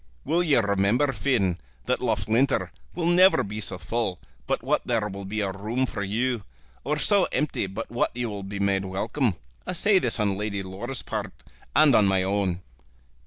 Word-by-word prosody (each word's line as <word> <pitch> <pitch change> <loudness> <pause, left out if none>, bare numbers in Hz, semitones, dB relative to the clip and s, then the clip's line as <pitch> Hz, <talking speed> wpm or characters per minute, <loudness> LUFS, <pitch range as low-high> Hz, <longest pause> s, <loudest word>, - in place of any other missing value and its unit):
Will 165 +5 +2
you 155 -7 +4
remember, 100 +7 +2
Finn, 100 -13 +1 0.3
that - - 0
Loughlinter 130 +5 +1 0.2
will 170 -1 -2
never 180 +3 +5
be 105 +1 -5
so 95 -3 -2
full 95 0 -2 0.3
but - - -1
what - - +1
there 115 -4 +1
will 100 0 -7
be 105 +3 -2
a 100 -2 -1
room 110 +7 -1
for 115 - -5
you, 115 +3 -1 0.4
or 150 +2 -1
so 195 +6 +4
empty 150 -9 -1
but 100 +4 -6
what 120 - +1
you 120 -1 -1
will 100 -2 -5
be 100 +1 -6
made 100 -1 +1
welcome? 105 - -1 0.3
I - - -2
say 195 +2 +4
this 120 -7 +1
on 100 -2 0
Lady 100 -2 -2
Laura's 105 +7 -5
part - - -4 0.4
and 150 -2 +6
on 105 -3 +5
my 95 -1 +2
own." 95 -2 0
110 Hz, 185 wpm, -26 LUFS, 100-135 Hz, 0.4 s, and